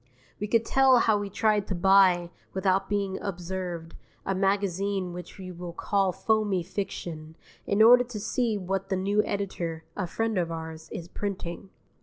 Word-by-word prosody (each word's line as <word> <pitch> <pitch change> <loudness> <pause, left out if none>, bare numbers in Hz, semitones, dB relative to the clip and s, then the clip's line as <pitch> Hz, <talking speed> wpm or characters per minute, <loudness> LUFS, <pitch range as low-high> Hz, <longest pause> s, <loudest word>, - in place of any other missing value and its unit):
We 210 - -2
could 230 +1 +2
tell 265 0 +5
how 220 -3 +3
we 205 -1 -4
tried 210 0 +1
to 190 - -2
buy, 180 -1 +4 0.2
without 190 0 +1
being 200 -2 -1
observed, 175 -3 -5 0.3
a 195 - 0
magazine 195 -1 0
which 175 -1 -9
we 185 -2 -7
will 175 -1 -7
call 195 +1 +1
Foamy 210 -2 +1
Fiction, 160 -4 -5 0.3
in 205 +2 +4
order 245 +2 +8
to 235 -3 -6
see 225 +1 0
what 195 0 -3
the 190 - +1
new 200 +3 +2
editor 170 -5 -3
(a 185 -3 -2
friend 225 +2 -1
of 170 -1 -1
ours) 160 -1 -7
is 170 - -6
printing. 190 -1 -5
195 Hz, 165 wpm, -27 LUFS, 175-205 Hz, 0.3 s, order